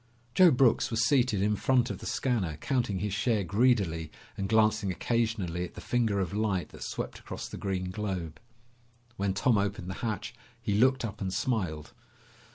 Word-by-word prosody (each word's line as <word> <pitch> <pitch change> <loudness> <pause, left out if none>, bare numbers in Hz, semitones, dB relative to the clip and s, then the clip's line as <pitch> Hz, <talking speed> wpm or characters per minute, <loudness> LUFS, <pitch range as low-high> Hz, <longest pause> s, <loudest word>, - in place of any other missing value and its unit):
Joe 185 -1 +7
Brooks 125 -4 +3
was 115 0 +1
seated 125 -8 +2
in 105 +1 +2
front 125 +2 +2
of - - -6
the - - -7
scanner 100 - -1
counting 120 - -1
his 100 +1 -2
share 110 0 +1
greedily 100 -7 +1 0.2
and 95 0 -3
glancing 110 -3 +3
occasionally 100 -3 -1
at 90 - -7
the - - -8
finger 115 -5 0
of 95 0 -2
light 100 -4 0
that - - -13
swept - - -5
across - - -7
the - - -8
green 95 -2 -2
globe. 95 -6 -4 0.8
When 95 -1 0
Tom 115 0 +3
opened 100 -2 -2
the 95 - -7
hatch, 110 -4 -3 0.3
he 105 - -2
looked 130 +4 +3
up 110 -1 -7
and 95 -1 -2
smiled. 95 -8 -2
105 Hz, 175 wpm, -29 LUFS, 95-120 Hz, 0.8 s, Joe